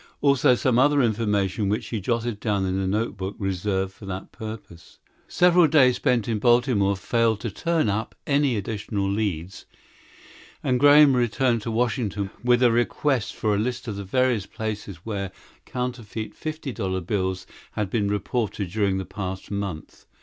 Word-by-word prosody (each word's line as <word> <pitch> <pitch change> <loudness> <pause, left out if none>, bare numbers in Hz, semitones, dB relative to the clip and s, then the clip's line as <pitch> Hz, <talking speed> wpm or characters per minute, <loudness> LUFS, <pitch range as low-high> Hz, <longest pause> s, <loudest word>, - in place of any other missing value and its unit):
Also 140 -3 +4
some 125 0 +2
other 145 +2 +4
information 105 -3 0
which 105 - -2
he 110 -4 -3
jotted 115 +1 -1
down 100 -4 0
in 95 0 -1
a 95 - -1
notebook 100 -1 -2
reserved 95 -1 -2
for 100 - -12
that 95 0 -6
purpose. 110 -6 -10 0.3
Several 175 -1 +5
days 130 -5 +5
spent 120 -4 +1
in 110 -2 -1
Baltimore 120 -4 +3
failed 110 +3 +1
to 115 - -3
turn 165 - 0
up 105 +3 -2
any 140 -3 +2
additional 100 -1 -3
leads 95 -3 -3 1.0
and 125 -1 +1
Graham 145 0 +7
returned 120 0 +1
to 115 - -4
Washington 110 -4 -1
with 125 0 +3
a 120 - +6
request 120 +1 0
for 105 -1 0
a 100 - +1
list 125 +3 -3
of 105 - -3
the 100 - -5
various 120 0 +1
places 105 -3 -5
where 100 -3 -3 0.4
counterfeit 120 -3 -4
fifty 155 -3 -5
dollar 95 -5 -2
bills 95 0 -2 0.3
had 105 -3 -2
been 105 -4 0
reported 105 -2 -2
during 100 -2 +1
the 95 - -3
past 95 -1 -6
month. 100 -6 -5
110 Hz, 160 wpm, -24 LUFS, 100-125 Hz, 1.0 s, Graham